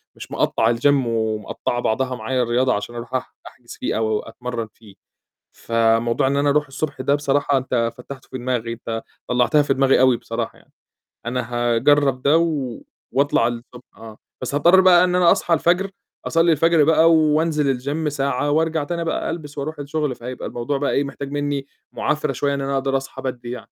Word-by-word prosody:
مش - - -11
مقطّع 115 +1 +1
والGym 115 +4 -7 0.2
ومقطّعة 110 +1 -2
بعضها 130 +3 -1
معايا 125 +3 -1
الرياضة 125 +2 +1
عشان 105 +4 -4
أرُوح 120 +2 -8
أح 130 - -4
أحجز - - -13
فيه - - -1
أو 110 -1 0
أتمرن 115 0 -6
فيه. 105 -4 -17 0.6
فموضوع 115 +2 +1
إن 140 +1 0
أنا 145 0 +2
أرُوح 150 0 +2
الصبح 140 0 -4
ده 140 +2 +2
بصراحة 145 -1 +1
أنت 120 -3 0
فتحته 130 +1 -10
في 130 - -4
دماغي، 120 -2 -2
أنت 115 -1 -5 0.3
طلعتها 125 +5 +3
في 140 -1 +1
دماغي 135 -1 +3
أوي 130 -2 +4
بصراحة - - -5
يعني، - - -25 0.5
أنا 125 +2 -1
هاجرّب 130 +3 +2
ده 145 +4 +4
و 145 -8 -1 0.3
وأطلع 140 -4 +2
الصبح 120 +1 -7
آه. 110 -1 -11 0.2
بس 130 +3 -3
هاضطر 175 +6 +6
بقى 180 -1 +6
إن 180 0 +1
أنا 175 -2 +5
أصحى 175 - +1
الفجر، 180 +4 +2 0.4
أصلي 165 0 +3
الفجر 165 0 +4
بقى 160 +2 +5
وأنزل 150 -3 +2
والGym 150 +4 -2
ساعة 140 0 -1
وأرجع 160 0 +1
تاني 170 +3 -3
بقى 165 - -2
ألبس 150 -3 -6
وأرُوح 145 +2 -4
الشغل، 145 -2 -2
فهيبقى 125 +1 -7
الموضوع 120 +4 -3
بقى 145 - -1
إيه، 140 - +1
محتاج 140 0 -7
مني 145 -1 -2 0.2
معافرة 150 0 -1
شوية، 140 -1 -1
إن 140 - -2
أنا 135 0 -2
أقدر 135 0 +1
أصحى 135 - -8
بدري 125 -2 -5
يعني. 125 - -5
135 Hz, 185 wpm, -21 LUFS, 120-150 Hz, 0.6 s, هاضطر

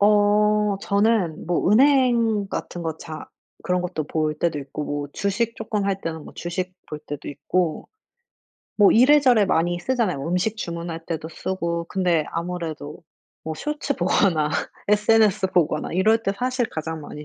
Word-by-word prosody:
어 210 0 +3
저는 200 -6 +1
뭐 175 +1 +1
은행 235 -4 +4
같은 175 -2 -5
거 160 -1 -3
자 155 -2 -8 0.4
그런 180 -1 0
것도 175 -4 -3
볼 155 0 -1
때도 155 -1 -1
있고 140 +2 -6
뭐 145 0 -4
주식 220 +4 -1
쪼끔 210 -2 -2
할 195 -1 -1
때는 160 -3 -5
뭐 - - -12
주식 180 +1 -4
볼 150 - -5
때도 145 -1 -7
있고. 160 +3 -2 0.9
뭐 205 -2 +6
이래저래 255 -3 +5
많이 175 0 +1
쓰잖아요. 210 - -1
음식 180 +5 0
주문할 170 -4 -5
때도 160 -2 -4
쓰고. 170 0 -3
근데 175 -5 +1
아무래도 165 -3 -5 0.4
뭐 160 - -3
쇼츠 290 - -3
보거나 175 -3 +2 0.4
SNS 210 -1 +4
보거나 155 -3 +1
이럴 220 +6 +3
때 195 - +1
사실 250 +1 -1
가장 160 0 -5
많이 150 +1 -9
180 Hz, 285 characters per minute, -23 LUFS, 160-210 Hz, 0.9 s, 뭐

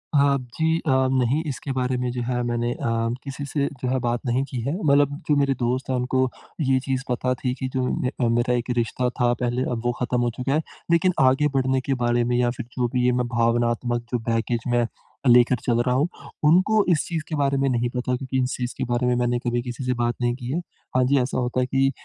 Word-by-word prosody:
हाँ, 140 -1 +4 0.2
जी 160 0 +2
अ, 155 - -4 0.2
नहीं 130 +3 +2
इसके 140 0 -4
बारे 130 -1 0
में 125 0 -1
जो 125 0 -3
है 125 -1 0
मैंने 120 0 -1
अ, - - -11 0.5
किसी 140 0 -6
से 140 0 -1
जो 125 - -1
है 130 +1 +1
बात 120 -1 -1
नहीं 125 +2 +1
की 130 - -4
है। 135 +6 -2
मतलब 145 -1 +4 0.2
जो 150 - +3
मेरे 140 -1 +2
दोस्त 125 +2 -1
हैं, 130 - +1
उनको 130 +1 +1 0.3
ये 130 -2 +3
चीज़ 135 -1 -1
पता 125 +1 0
थी 125 0 -2
कि 130 - -2
जो 130 - 0
में 125 -1 -1
मेरा 120 +1 +2
एक 125 0 -2
रिश्ता 120 +2 0
था, 120 -1 +1
पहले 120 +1 -1
अब 120 -2 -2
वो 120 - +3
ख़त्म 125 0 +1
हो 120 - +1
चुका 130 +2 -1
है। 155 - +2 0.3
लेकिन 170 +2 +4
आगे 135 +3 +4
बढ़ने 130 0 +2
के 135 - -1
बारे 120 0 +2
में 120 +1 0
या 120 0 +2
फिर - - -5
जो 125 -1 +2
भी 125 -1 +2
है, 125 - +4
मैं 125 0 0
भावनात्मक 120 0 +1
जो 125 - 0
बैगेज 115 +1 0
में 120 -1 +2 0.4
लेकर 125 +1 +6
चल 120 -1 +1
रहा 125 0 +1
हूँ, 140 +5 +2 0.4
उनको 190 +7 +4
इस 165 -4 +2
चीज़ 165 -3 -2
के 160 - -2
बारे 140 -1 +1
में 135 0 +1
नहीं 120 -1 0
पता 125 0 0
क्योंकि 130 +1 -3
इस 125 - -2
चीज़ 125 -1 -3
के 130 - -2
बारे 120 +1 +1
में 125 - +2
मैंने 120 0 +1
कभी 120 0 -1
किसी 125 +2 -6
से 125 0 0
बात 120 0 0
नहीं 120 0 +1
की 125 -1 -6
है। 160 - 0 0.4
हाँ 130 - +4
जी, 140 +2 +3
ऐसा 125 - -2
होता 125 0 -1
है 125 - +2
कि 135 +1 +2
125 Hz, 250 wpm, -24 LUFS, 120-135 Hz, 0.5 s, लेकर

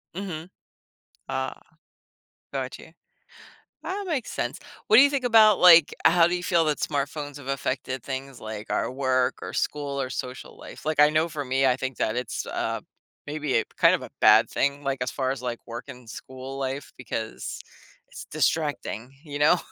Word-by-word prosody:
Mhm. 180 -3 -5 0.8
Ah. - - -3 0.9
Got - - -4
you. - - -14 0.9
That 395 +1 -4
makes 285 -8 -2
sense. - - -3 0.3
What 220 - +7
do 265 - +10
you 285 - +5
think 275 -3 -1
about, 220 -3 +6
like 170 -4 +8
how 170 0 +6
do 175 - 0
you 175 - -3
feel 170 -2 +2
that 150 -1 0
smartphones 145 0 -3
have 140 -2 -11
affected 130 -1 -2
things 135 -1 -6
like 110 0 -7
our - - 0
work, 130 -1 +1
or - - -6
school, 140 -2 -2
or 130 - -3
social 130 0 -6
life? - - -11
Like, 155 -1 -1
I 150 0 +8
know 155 +2 +1
for 145 -2 -4
me, 130 +1 +1
I 125 - +3
think 130 -1 -4
that 110 - 0
it's 125 -2 -3
a - - -2 0.5
maybe, 145 -3 -1
a - - -3
kind - - +6
of - - -5
a - - -8
bad - - +7
thing, 140 +1 0
like, 135 -1 -1
as 125 - -1
far 130 -1 -1
as, 135 -2 -5
like, 120 -2 -3
work 120 +2 -6
and 125 -2 -11
school 130 +3 -8
life, 135 +1 -4
because 110 -3 -5 0.5
it's - - -9
distracting, 120 +5 -1
you 145 -1 -5
know? 150 +4 +5
140 Hz, 185 wpm, -26 LUFS, 130-160 Hz, 0.9 s, do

